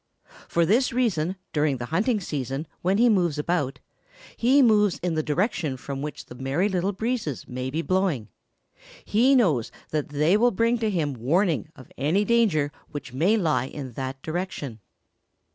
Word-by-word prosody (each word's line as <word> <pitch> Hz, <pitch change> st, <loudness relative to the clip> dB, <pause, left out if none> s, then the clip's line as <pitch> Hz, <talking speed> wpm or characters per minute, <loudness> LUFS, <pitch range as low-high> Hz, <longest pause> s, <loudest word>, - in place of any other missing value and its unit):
For 170 Hz, 0 st, +2 dB
this 235 Hz, +9 st, +3 dB
reason, 190 Hz, -9 st, 0 dB, 0.2 s
during 150 Hz, -3 st, +1 dB
the 120 Hz, -, -5 dB
hunting 215 Hz, +6 st, +2 dB
season 140 Hz, -4 st, -4 dB, 0.2 s
when 190 Hz, +3 st, +2 dB
he 240 Hz, +2 st, +5 dB
moves 175 Hz, -9 st, +2 dB
about, 150 Hz, -4 st, -1 dB, 0.6 s
he 265 Hz, +4 st, +4 dB
moves 210 Hz, -5 st, +4 dB
in 180 Hz, -2 st, 0 dB
the 155 Hz, -, +1 dB
direction 155 Hz, -, -1 dB
from 135 Hz, +2 st, -6 dB
which 150 Hz, +1 st, -6 dB
the -, -, -11 dB
Merry 135 Hz, +9 st, 0 dB
Little 190 Hz, 0 st, 0 dB
Breezes 220 Hz, -, -3 dB
may 130 Hz, +1 st, -4 dB
be 160 Hz, +5 st, -2 dB
blowing. 185 Hz, -, 0 dB, 0.8 s
He 250 Hz, +6 st, +4 dB
knows 160 Hz, -, +2 dB, 0.2 s
that 150 Hz, -2 st, -1 dB
they 150 Hz, +6 st, +3 dB
will 240 Hz, +3 st, +4 dB
bring 230 Hz, +2 st, +1 dB
to 220 Hz, -1 st, 0 dB
him 160 Hz, -8 st, -1 dB
warning 155 Hz, -, +1 dB
of 130 Hz, -, -15 dB
any 165 Hz, +10 st, +2 dB
danger 200 Hz, -11 st, +2 dB, 0.2 s
which 145 Hz, -4 st, -7 dB
may 175 Hz, +12 st, +3 dB
lie 150 Hz, -, +1 dB
in 135 Hz, -2 st, -7 dB
that 130 Hz, +1 st, -5 dB
direction. 155 Hz, -, -4 dB
165 Hz, 165 wpm, -25 LUFS, 140-210 Hz, 0.8 s, he